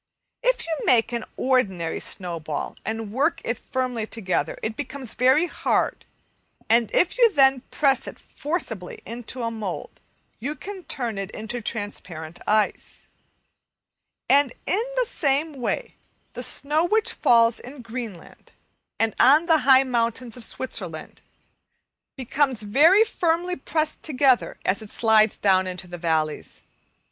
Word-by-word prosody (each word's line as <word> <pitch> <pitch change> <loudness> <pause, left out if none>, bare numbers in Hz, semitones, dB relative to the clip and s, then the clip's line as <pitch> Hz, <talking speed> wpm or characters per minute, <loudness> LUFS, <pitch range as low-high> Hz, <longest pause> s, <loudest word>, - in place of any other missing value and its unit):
If - - +1
you 330 - -2
make 230 -2 +4
an 235 -2 -3
ordinary 190 -11 0
snowball 165 -5 -4
and 220 -1 -4
work 285 +8 +1
it 230 0 -2
firmly 250 -4 -3
together, 195 -6 -2
it 220 0 -2
becomes 265 -3 -6
very 260 +6 +4
hard, - - -1 0.6
and 230 -1 +3
if 360 +7 +1
you 470 -2 +6
then 270 -5 +4
press 275 -3 +1
it - - -8
forcibly 235 - -4
into 240 +3 -5
a 230 - -1
mould 215 -5 -6 0.4
you 280 +7 -3
can 385 -1 -9
turn 235 -7 -3
it 195 -1 -4
into 230 +3 -6
transparent 180 -7 -5
ice. 215 0 0 1.2
And 280 -2 +4
in 400 - +2
the - - +2
same 295 -3 0
way - - -2 0.4
the - - -5
snow 300 +3 +1
which 430 +5 +1
falls 230 -1 +4
in 255 0 -10
Greenland 230 -6 -8 0.4
and 225 -1 +1
on 295 +6 +6
the 325 -2 +4
high 265 0 +8
mountains 235 -1 -1
of 245 - -10
Switzerland 185 -10 -5 1.0
becomes 260 -2 0
very 315 - +6
firmly 355 -4 0
pressed 310 +2 -2
together, 270 -4 +2
as 195 - +1
it 215 - -10
slides 220 -2 +4
down 190 -2 +3
into 185 0 -5
the 175 -1 -9
valleys. 160 -2 -2
245 Hz, 135 wpm, -24 LUFS, 215-290 Hz, 1.2 s, high